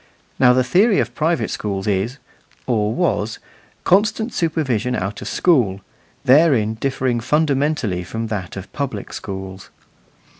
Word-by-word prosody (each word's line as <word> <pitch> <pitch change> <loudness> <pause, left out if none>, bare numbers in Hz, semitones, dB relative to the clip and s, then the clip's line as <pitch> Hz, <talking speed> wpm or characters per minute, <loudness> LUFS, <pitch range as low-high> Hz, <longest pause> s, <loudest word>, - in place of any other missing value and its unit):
Now 125 -1 +6
the 130 0 +3
theory 195 - +3
of - - 0
private 165 +1 0
schools 100 -2 -3
is 105 +6 -1 0.5
(or 110 -4 +1
was) 115 -7 -1 0.5
constant 215 +4 +2
supervision 130 -8 0
out 100 +1 -3
of - - -6
school 120 - +2 0.4
therein 130 -6 +4
differing 130 -2 0
fundamentally 140 - 0
from 110 +6 -4
that 100 -5 -5
of 95 - -9
public 135 -8 -4
schools. 95 -1 -7
125 Hz, 125 wpm, -20 LUFS, 105-155 Hz, 0.5 s, Now